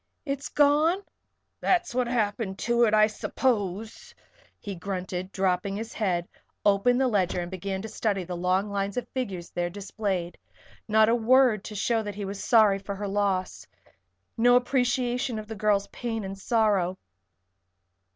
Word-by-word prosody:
It's 275 -1 -3
gone?" 305 +6 +3 0.6
"That's 355 -4 +1
what 250 0 +1
happened 210 -4 -1
to 235 +2 +2
it, 215 - +1
I 215 0 +6
suppose," 220 - -2 0.4
he 205 - -6
grunted, 185 0 -4
and 190 - -20
dropping 190 0 0
his 220 +2 -5
head, 180 -5 -1 0.4
opened 205 +5 +3
the 265 - +3
ledger 190 -6 +1
and 175 +1 -5
began 190 +1 -4
to - - -4
study 210 -3 -1
the 180 0 -5
long 185 +3 0
lines 200 +1 -2
of 245 -1 -2
figures 195 -10 -4
there 175 0 -2
displayed. 190 -2 -4 0.5
Not 220 0 +5
a - - +4
word 240 -2 +4
to 215 - -7
show 225 +3 +1
that 205 -2 -6
he 205 -1 -4
was 195 +1 -5
sorry 215 -5 +5
for 200 0 -6
her 205 +1 -4
loss. 195 -2 -1 0.7
No 245 +2 +5
appreciation 245 -1 +1
of 215 - -5
the 225 - -6
girl's 210 -2 +1
pain 225 -3 -4
and 195 0 -5
sorrow. 195 -3 +1
210 Hz, 160 wpm, -27 LUFS, 195-240 Hz, 0.7 s, I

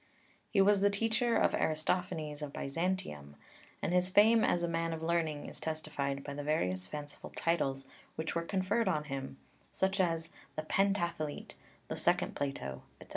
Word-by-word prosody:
He 200 - +4
was 200 +1 +5
the 200 - +5
teacher 225 +3 +1
of - - +3
Aristophanes 155 -1 0
of 145 -1 -4
Byzantium, 140 - -3 0.5
and 175 - 0
his 180 0 +4
fame 220 +3 +6
as 175 0 +2
a - - +2
man 165 0 -1
of 160 0 -5
learning 160 -3 0
is - - -7
testified 145 -3 -3
by 140 - -5
the 145 - -4
various 95 -12 0
fanciful 145 +3 -7
titles 135 -5 0 0.3
which 160 +1 -3
were 170 - 0
conferred 190 +5 0
on 155 -5 +1
him, 135 -2 -5 0.3
such 190 +1 0
as 165 -2 +1 0.3
"The 155 - -2
Pentathlete," 170 -4 0 0.3
"The - - -3
second - - +3
Plato," 135 - -3 0.2
etc. - - -14
165 Hz, 165 wpm, -33 LUFS, 145-185 Hz, 0.5 s, fame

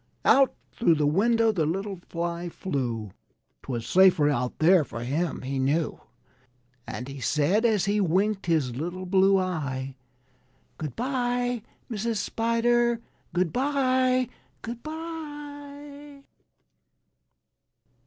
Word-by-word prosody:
Out 270 -1 +5 0.2
thro' 170 -9 +3
the 150 -1 +1
window 225 +8 +3
the 165 -7 0
little 195 +3 -3
Fly 170 +1 -3
flew; 120 - -3 0.5
'Twas 120 -3 -4
safer 180 -2 +5
out 125 -3 -1
there 170 +1 +5
for 115 -4 -7
him, 150 +6 -2
he 135 +1 -2
knew. 145 +4 0 0.9
And 125 - -5
he 140 0 -7
said, 155 - +2
as 215 -5 +3
he 205 +1 +1
winked 195 +3 +1
his 150 -8 +1
little 175 +6 -4
blue 195 +1 +4
eye: 140 -8 -2 0.9
"Good 150 -4 -5
by, 245 -1 -1 0.3
Mrs. 225 0 -2
Spider; 235 +2 +1 0.3
good 175 -1 0
by, 255 -2 +2 0.4
good 235 +1 -6
by!" 290 -2 -8
195 Hz, 115 wpm, -26 LUFS, 155-245 Hz, 0.9 s, Out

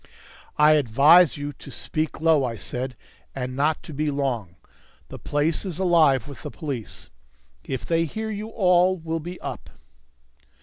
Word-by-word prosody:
"I 150 +1 +6
advise 150 +5 +5
you 145 0 -5
to - - -13
speak 155 0 -3
low," 160 -3 +4
I 115 -3 -3
said, 125 +5 -5 0.4
"and 130 -1 -4
not 150 +3 0
to 160 - -9
be 150 +2 -1
long. 125 -11 -2 0.5
The - - -9
place 150 +2 -1
is 185 -5 -5
alive 160 - +3
with 140 -3 -10
the - - -6
police. 140 -9 -7 0.5
If 130 -2 -5
they 165 0 +1
hear 220 +7 -5
you 210 +1 -5
all 185 -3 +3
will 165 0 -3
be 175 +3 -8
up." - - -7
150 Hz, 160 wpm, -24 LUFS, 135-170 Hz, 0.5 s, I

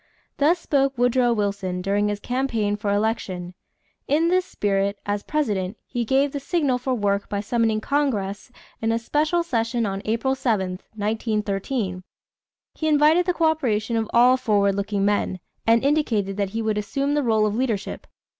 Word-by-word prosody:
Thus 305 +5 +3
spoke 275 -5 0
Woodrow 245 0 +3
Wilson 200 -4 -1
during 200 +3 +1
his 205 -1 -2
campaign 235 -4 -1
for 205 -1 -2
election. 200 -4 -1 0.5
In 320 +4 +2
this 365 0 +2
spirit, 200 0 0
as 205 0 -1
President, 210 -10 -1
he 240 -2 -3
gave 270 +4 +2
the 285 - -3
signal 280 -4 0
for 255 +1 -1
work 200 -2 0
by 200 - -2
summoning 220 +1 +1
Congress 225 -7 -1 0.3
in 225 0 +1
a 230 - +1
special 305 +8 0
session 230 -5 -1
on 195 -1 -3
April 230 +4 0
7, 195 -8 -1 0.2
1913. 210 -2 -2 0.7
He 315 - -3
invited 310 +4 +4
the 360 - +2
coöperation 245 -9 +1
of 225 -1 -1
all 250 +2 +5
"forward 205 -5 +2
looking 200 0 -1
men" 205 -2 0 0.3
and 230 +3 +4
indicated 230 -10 +1
that 200 -1 -1
he 225 +3 -3
would 215 -1 0
assume 275 +8 -1
the 295 - +2
rôle 220 -4 +2
of 210 - 0
leadership. 225 -5 -2
225 Hz, 165 wpm, -23 LUFS, 205-270 Hz, 0.7 s, all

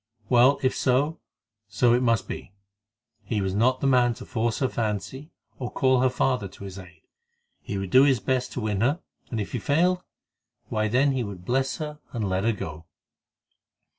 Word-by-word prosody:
Well, 125 +3 +5
if 130 - +2
so, 140 +5 +1 0.5
so 115 +3 +3
it 125 - +3
must 115 -4 +1
be; 95 - -7 0.7
he 105 +1 -2
was 95 -1 -1
not 125 +5 +2
the - - -1
man 125 -3 +4
to - - -10
force 115 -1 -1
her 130 - +1
fancy, 115 - -3 0.3
or 125 -2 -3
call 130 -2 +3
her 130 - +4
father 125 -4 0
to 95 +1 -13
his 95 0 -7
aid. 90 -4 -14 0.6
He 100 - -5
would 95 -2 -4
do 130 - +7
his 135 -3 +4
best 130 -1 -1
to 125 - -3
win 105 -2 -1
her, 140 +8 +2 0.3
and 115 - -3
if 100 - -4
he 125 - -2
failed, 175 - +2 0.7
why 110 0 0
then 130 +6 +3
he 130 -2 -1
would 95 -4 -8
bless 130 +3 0
her, 150 -2 -6
and 110 -4 -2
let 95 0 0
her 115 - +4
go. 80 -6 -6
120 Hz, 195 wpm, -26 LUFS, 105-130 Hz, 0.7 s, do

